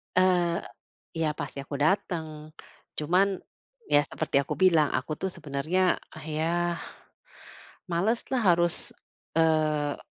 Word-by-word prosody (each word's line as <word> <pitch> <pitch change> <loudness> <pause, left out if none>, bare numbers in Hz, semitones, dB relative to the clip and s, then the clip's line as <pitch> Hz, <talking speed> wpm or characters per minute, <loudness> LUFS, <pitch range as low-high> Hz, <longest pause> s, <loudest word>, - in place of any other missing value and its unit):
Eee, 180 -2 +3 0.5
iya 160 -1 +2
pasti 140 -1 -5
aku 140 +1 -6
dateng. 155 -1 -1 0.5
Cuman 180 +6 +3 0.6
ya 145 - +7
seperti 140 - 0
aku 140 - -2
bilang 160 -5 +5
aku 130 +4 -2
tuh 190 - -1
sebenernya 160 +3 0 0.2
ya 165 +2 -1 1.1
maleslah 225 +8 0
harus, 175 0 +2 0.6
eee, 155 -3 +2
160 Hz, 100 wpm, -28 LUFS, 150-175 Hz, 1.1 s, ya